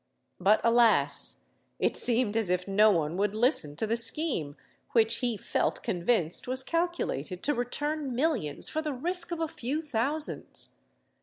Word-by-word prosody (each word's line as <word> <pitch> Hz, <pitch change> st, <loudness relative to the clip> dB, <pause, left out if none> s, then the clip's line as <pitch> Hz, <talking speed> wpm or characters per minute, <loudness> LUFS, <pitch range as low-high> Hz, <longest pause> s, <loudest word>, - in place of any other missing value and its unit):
But, 200 Hz, +4 st, +3 dB
alas! 230 Hz, -1 st, +2 dB, 0.3 s
it -, -, 0 dB
seemed 235 Hz, -3 st, +4 dB
as 220 Hz, -5 st, 0 dB
if 180 Hz, +1 st, -1 dB
no 210 Hz, +2 st, +4 dB
one 165 Hz, -3 st, 0 dB
would 205 Hz, +1 st, -1 dB
listen 220 Hz, -, +2 dB
to 195 Hz, -, -1 dB
the 220 Hz, +1 st, 0 dB
scheme 230 Hz, -, 0 dB, 0.4 s
which 225 Hz, -1 st, +2 dB
he 240 Hz, -3 st, -2 dB
felt -, -, -2 dB
convinced 175 Hz, -1 st, 0 dB
was 260 Hz, +1 st, -1 dB
calculated 330 Hz, -, -3 dB
to 295 Hz, -, +1 dB
return 285 Hz, +2 st, -3 dB
millions 250 Hz, -, -1 dB
for 315 Hz, -, -3 dB
the 305 Hz, -2 st, -4 dB
risk 345 Hz, +7 st, +1 dB
of 340 Hz, -, -3 dB
a 325 Hz, -, -1 dB
few 280 Hz, +1 st, -4 dB
thousands! 295 Hz, +1 st, -2 dB
235 Hz, 155 wpm, -28 LUFS, 195-295 Hz, 0.4 s, seemed